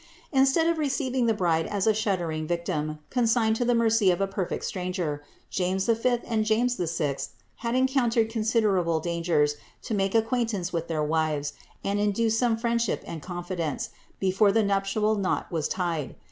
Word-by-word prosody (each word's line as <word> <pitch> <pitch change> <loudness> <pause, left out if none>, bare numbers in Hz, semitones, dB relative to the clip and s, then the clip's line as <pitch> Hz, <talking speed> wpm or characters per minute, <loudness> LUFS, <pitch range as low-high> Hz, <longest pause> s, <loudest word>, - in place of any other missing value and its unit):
Instead 270 +3 +4
of 335 -1 +1
receiving 265 -4 0
the 225 - +4
bride 165 -4 +1
as 200 -2 -1
a 220 - +4
shuddering 175 -7 -1
victim, 155 -3 -2
consigned 230 -3 +2
to 245 - 0
the 245 0 +2
mercy 225 -3 +3
of 180 - +2
a 195 - +2
perfect 195 -2 -3
stranger, 180 -5 -3 0.3
James 190 +1 0
V. 235 +2 +2
and 225 -2 0
James 225 +3 +2
VI. 160 -5 -1 0.4
had 235 0 -2
encountered 255 -3 +2
considerable 215 -7 +1
dangers 165 -3 +1 0.3
to - - -4
make 195 0 0
acquaintance 225 -5 0
with 165 -1 -2
their 155 -2 -1
wives, 150 -2 0 0.3
and 200 +1 0
induce 215 +2 +1
some 235 -3 +2
friendship 235 -1 0
and 165 -2 -6
confi 175 +2 -5
dence 160 -5 -2 0.3
before 195 +2 +3
the 225 +2 +3
nuptial 200 +2 +1
knot 195 -2 -1
was 160 -3 0
tied. 165 -7 -2
200 Hz, 165 wpm, -26 LUFS, 170-230 Hz, 0.4 s, Instead